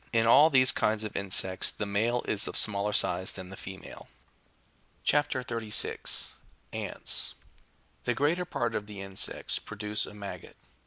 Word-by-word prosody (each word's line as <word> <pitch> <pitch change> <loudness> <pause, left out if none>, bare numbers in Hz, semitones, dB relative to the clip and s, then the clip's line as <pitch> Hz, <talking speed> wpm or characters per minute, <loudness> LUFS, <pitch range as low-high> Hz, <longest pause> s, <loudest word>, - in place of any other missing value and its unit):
In 115 -1 +2
all 145 +7 +7
these 130 -3 +6
kinds 110 0 0
of 105 - -6
insects 95 -1 +2
the 105 - -5
male 115 +4 0
is 100 - 0
of - - -3
smaller 105 -1 +2
size 90 -2 +1
than 95 0 -9
the - - -7
female. 95 0 -9 1.0
chap. 145 0 +2
36. 115 -5 0 0.3
(30.) - - -3
— - - -9
ants. - - -2 0.7
The 120 - 0
greater 160 +7 +1
part - - -2
of 105 - -3
the 105 -2 -9
insects 95 -1 +1
produce 105 0 -3
a - - -11
maggot. 100 -1 -9
105 Hz, 160 wpm, -29 LUFS, 100-120 Hz, 1.0 s, all